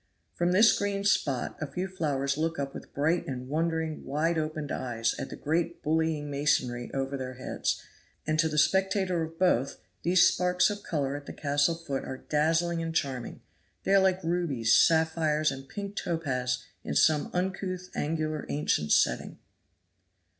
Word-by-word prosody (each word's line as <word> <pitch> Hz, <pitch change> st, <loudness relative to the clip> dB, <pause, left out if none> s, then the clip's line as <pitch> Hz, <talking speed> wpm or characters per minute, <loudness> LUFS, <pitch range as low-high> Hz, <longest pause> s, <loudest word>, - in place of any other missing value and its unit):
From 175 Hz, +1 st, +1 dB
this 210 Hz, +5 st, +6 dB
green 200 Hz, -1 st, -1 dB
spot 140 Hz, -10 st, +1 dB
a 155 Hz, -, -2 dB
few 180 Hz, +6 st, -3 dB
flowers 140 Hz, -7 st, -1 dB
look 160 Hz, +2 st, -1 dB
up 140 Hz, -1 st, -3 dB
with -, -, -10 dB
bright 160 Hz, +5 st, 0 dB
and 125 Hz, -1 st, -5 dB
wondering 160 Hz, +1 st, -1 dB
wide 160 Hz, +4 st, 0 dB
opened 155 Hz, -1 st, -3 dB
eyes 115 Hz, -2 st, -1 dB
at -, -, -4 dB
the -, -, -7 dB
great 170 Hz, +3 st, -1 dB
bullying 160 Hz, -1 st, 0 dB
masonry 140 Hz, -4 st, 0 dB
over 135 Hz, 0 st, -2 dB
their 130 Hz, -1 st, -5 dB
heads; 130 Hz, -, -2 dB, 0.5 s
and 155 Hz, 0 st, 0 dB
to 160 Hz, 0 st, +3 dB
the 150 Hz, -, -3 dB
spectator 190 Hz, +2 st, +2 dB
of 160 Hz, 0 st, -5 dB
both, 140 Hz, -8 st, +2 dB, 0.2 s
these 175 Hz, +1 st, +5 dB
sparks 180 Hz, +2 st, +2 dB
of 205 Hz, -, -5 dB
color 140 Hz, -4 st, -2 dB
at 145 Hz, -1 st, -8 dB
the -, -, -6 dB
castle 145 Hz, +2 st, +1 dB
foot 140 Hz, -5 st, -4 dB
are 130 Hz, -, -5 dB
dazzling 165 Hz, +4 st, +1 dB
and 165 Hz, 0 st, -4 dB
charming; 130 Hz, -5 st, -2 dB, 0.4 s
they 195 Hz, -, +1 dB
are 195 Hz, -, +7 dB
like 190 Hz, -1 st, +2 dB
rubies, 160 Hz, -10 st, +1 dB
sapphires 160 Hz, -2 st, +3 dB
and 135 Hz, 0 st, -8 dB
pink 200 Hz, 0 st, -6 dB
topaz 130 Hz, -9 st, -1 dB, 0.2 s
in -, -, -4 dB
some 155 Hz, -2 st, +3 dB
uncouth 185 Hz, 0 st, -3 dB
angular 155 Hz, 0 st, -2 dB
ancient 110 Hz, -, 0 dB
setting. -, -, +2 dB
155 Hz, 165 wpm, -28 LUFS, 140-175 Hz, 0.5 s, are